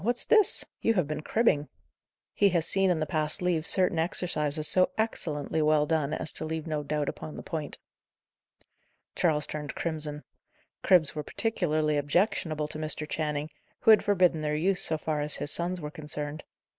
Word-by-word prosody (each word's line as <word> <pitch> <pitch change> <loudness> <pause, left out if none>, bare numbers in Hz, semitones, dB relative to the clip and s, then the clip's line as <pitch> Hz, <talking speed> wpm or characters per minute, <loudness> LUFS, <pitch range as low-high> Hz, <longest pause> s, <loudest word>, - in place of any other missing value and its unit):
what's 240 +3 0
this! 430 -3 +3 0.2
You 225 - +2
have 180 -5 +2
been 150 0 -4
cribbing." 155 -7 +1 0.6
He 200 - +3
had 170 -3 +1
seen 195 +3 +3
in 175 -3 +1
the 155 - 0
past 155 0 -1
leaves 175 -3 +2
certain 185 -4 +3
exercises 155 -3 +1
so 185 0 +4
excellently 160 -8 -1
well 150 -1 +3
done 155 -2 0
as 155 0 -2
to - - -2
leave 160 0 -4
no 155 -2 -2
doubt 150 0 -2
upon 155 - -6
the - - -8
point. 155 -3 -5 1.4
Charles 150 -4 +1
turned 150 -2 -6
crimson. 155 -3 -4 0.6
Cribs 175 -6 +3
were 150 - -4
particularly 155 -5 -1
objectionable 155 0 0
to 155 - -6
Mr. 155 0 -2
Channing, 150 -1 -3 0.3
who 225 - +6
had 215 - +6
forbidden 180 -5 +2
their 150 0 -1
use, 180 +5 +2
so 160 - 0
far 150 -1 -2
as 150 0 -2
his 145 - -3
sons 175 +1 -1
were 150 -2 -6
concerned. 150 0 -6
155 Hz, 175 wpm, -28 LUFS, 150-180 Hz, 1.4 s, who